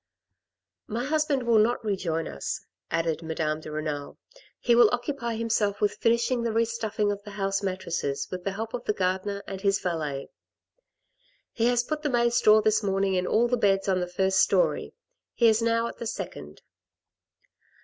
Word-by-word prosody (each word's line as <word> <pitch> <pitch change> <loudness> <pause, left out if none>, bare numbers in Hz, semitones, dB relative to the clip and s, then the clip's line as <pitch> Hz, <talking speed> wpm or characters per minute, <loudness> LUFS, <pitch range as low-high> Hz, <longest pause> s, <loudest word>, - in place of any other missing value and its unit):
" - - -64
My 240 - -1
husband 295 -2 +1
will 235 -2 +4
not 225 +1 +1
rejoin 170 -6 -1
us," 70 - -5 0.2
added 165 -1 -1
Madame 160 -1 -2
de 155 - -9
Renal; 150 -2 -4 0.4
"he 240 - +2
will 235 -2 +7
occupy 245 -1 -2
himself 215 -3 0
with 210 - 0
finishing 235 +1 +2
the 235 -1 -1
re 230 +1 +2
stuffing 220 -2 -1
of 205 0 -4
the 205 - -11
house 195 0 0
mattresses 175 -7 -2
with 180 -1 -5
the 195 - -2
help 220 +2 -5
of 245 - -4
the 210 - +1
gardener 190 +1 -1
and 195 -1 -6
his 195 -1 +2
valet. 150 -6 -3 1.2
He 230 0 +1
has 245 0 +2
put 305 +4 -3
the 295 - -1
May 240 -2 +2
straw 215 -2 +5
this 215 0 +2
morning 195 -1 0
in 180 -1 0
all 235 +2 +3
the 245 +1 +1
beds 195 -3 +2
on 190 -1 +2
the 180 - -2
first 190 +1 +1
storey; - - +2 0.4
he 235 - +4
is 220 0 +4
now 230 0 +2
at - - -6
the 235 - -4
second." - - -7
210 Hz, 185 wpm, -27 LUFS, 185-235 Hz, 1.2 s, will